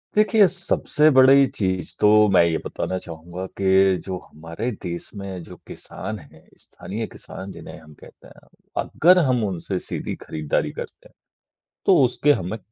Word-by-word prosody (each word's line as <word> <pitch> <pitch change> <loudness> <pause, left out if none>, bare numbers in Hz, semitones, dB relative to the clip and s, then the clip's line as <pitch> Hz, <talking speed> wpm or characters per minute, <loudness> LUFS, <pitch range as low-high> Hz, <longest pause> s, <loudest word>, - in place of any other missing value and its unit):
देखिए, 215 -1 +5
सबसे 175 -4 +1
बड़ी 135 +1 +7
चीज़ 95 -3 -2
तो 105 0 +6
मैं 90 - +6
ये 85 -1 +1
बताना 95 - -3
चाहूँगा 85 +1 -8
कि 95 0 +4
जो 95 -1 -4
हमारे 85 +9 -5
देश 85 -1 -5
में 95 -3 -7
जो - - -12
किसान 110 -1 -7
हैं, 80 0 -18
स्थानीय 110 +4 -7
किसान 95 +1 -10
जिन्हें 90 - -10
हम 75 -2 -16
कहते - - -16
हैं। - - -19 0.4
अगर 180 +3 +4
हम 130 -8 +1
उनसे 90 0 -4
सीधी - - -4
खरीदारी 75 -2 -2
करते - - -10
हैं, - - -31 0.7
तो 190 - +6
उसके 140 +4 +2
हमें 100 -2 -3
95 Hz, 155 wpm, -22 LUFS, 85-130 Hz, 0.7 s, बड़ी